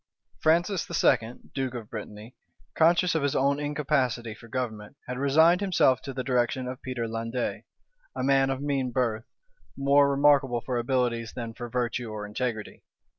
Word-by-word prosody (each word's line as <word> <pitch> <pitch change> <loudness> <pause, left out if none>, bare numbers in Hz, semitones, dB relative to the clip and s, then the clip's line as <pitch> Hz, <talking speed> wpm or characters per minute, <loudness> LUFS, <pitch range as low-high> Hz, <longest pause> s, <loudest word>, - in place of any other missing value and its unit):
Francis 170 - +2
II., 115 +2 +2 0.2
duke 130 -2 -2
of 115 -3 -8
Brittany, 105 +1 -8 0.4
conscious 170 +2 +3
of 160 - +1
his 145 -1 0
own 140 +1 +2
incapacity 140 -6 -1
for 115 - -14
government, 115 -3 -4
had 125 0 -4
resigned 160 +6 +4
himself 175 -9 +3
to 135 - -6
the 130 -1 -4
direction 125 0 0
of 125 0 -6
Peter 125 -3 -3
Landais, 115 +2 -3 0.5
a - - -3
man 135 0 +3
of 135 +1 -2
mean 135 -3 0
birth, 120 -3 -1 0.5
more 140 +1 +4
remarkable 140 -3 +3
for 120 +1 -2
abilities 120 -2 -1
than 115 -2 -5
for 120 +1 -7
virtue 120 -1 -2
or 105 -1 -5
integrity. 110 0 -4
130 Hz, 160 wpm, -27 LUFS, 115-140 Hz, 0.5 s, resigned